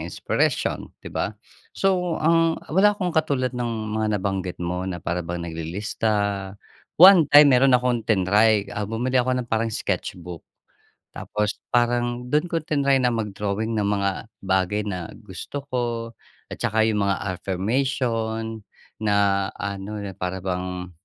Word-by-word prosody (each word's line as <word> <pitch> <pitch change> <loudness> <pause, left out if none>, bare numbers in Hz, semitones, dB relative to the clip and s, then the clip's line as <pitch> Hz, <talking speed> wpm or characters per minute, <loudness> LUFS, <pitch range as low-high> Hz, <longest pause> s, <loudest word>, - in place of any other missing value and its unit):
inspiration, - - -1 0.2
‘di - - -8
ba? - - -2 0.4
So 180 -3 +1
ang 165 0 +3 0.2
wala 205 +4 +4
akong 180 -4 -2
katulad 140 -6 0
ng 120 -1 -2 0.2
mga 110 -1 0
nabanggit 95 -2 -3
mo 90 +1 -2
na 90 - -3
para 85 +1 -3
bang 85 0 -5
naglilista. 100 +4 -2 0.4
One 180 -3 +8
time, 145 -1 +8
meron 130 0 +5
akong 125 -2 -1
tinry 105 +1 +3
ah, 105 -1 -3
bumili 125 +4 +1
ako 125 +1 0
ng - - -19
parang 115 0 0
sketch 110 - -3
book. 90 -1 -9 0.7
Tapos 105 0 -2 0.2
parang 120 0 0
dun 150 +4 +2
ko 165 -2 -2
tinry 140 -3 +2
na 125 -2 +2
mag-drawing 105 0 -2
ng 105 - +1
mga 100 -1 +1 0.3
bagay 95 +2 0
na 90 -4 -5
gusto 125 +7 -8
ko, 125 -1 -1 0.7
at - - -7
saka 110 +1 0
yung 105 -2 +1
mga 100 0 +1 0.2
affirmation 110 +1 -2 0.4
na 100 -2 +2
ano, 100 +1 -5
na 100 -1 -5
para 90 0 -4
bang, 90 -1 -3
110 Hz, 145 wpm, -23 LUFS, 95-125 Hz, 0.7 s, One